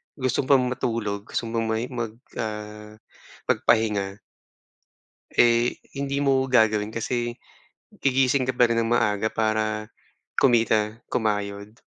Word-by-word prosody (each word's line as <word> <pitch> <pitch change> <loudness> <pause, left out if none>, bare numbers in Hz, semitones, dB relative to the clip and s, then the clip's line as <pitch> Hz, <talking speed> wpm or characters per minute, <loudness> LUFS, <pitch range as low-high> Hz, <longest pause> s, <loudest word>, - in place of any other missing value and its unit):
gusto 130 -3 0
mo - - -9
pang 130 -1 +3
matulog, 105 -5 -2
gusto - - -2
mo 115 0 -1
pang 115 - -2
mahi 115 +2 -1
mag 120 -3 -3 0.3
ah, 105 0 -6 0.6
magpahinga 105 -4 +1 1.2
eh, 120 0 +3 0.2
hindi 140 0 -2
mo 135 -2 +3
gagawin 110 -3 +3
kasi 120 +1 -2 0.7
gigising 130 -1 +2
ka - - +4
pa 125 - +4
rin 115 - +1
ng 115 0 -1
maaga 110 -2 +1
para 110 -1 0 0.5
kumita, 115 -3 +3
kumayod. 105 -2 -2
115 Hz, 125 wpm, -25 LUFS, 105-125 Hz, 1.2 s, ka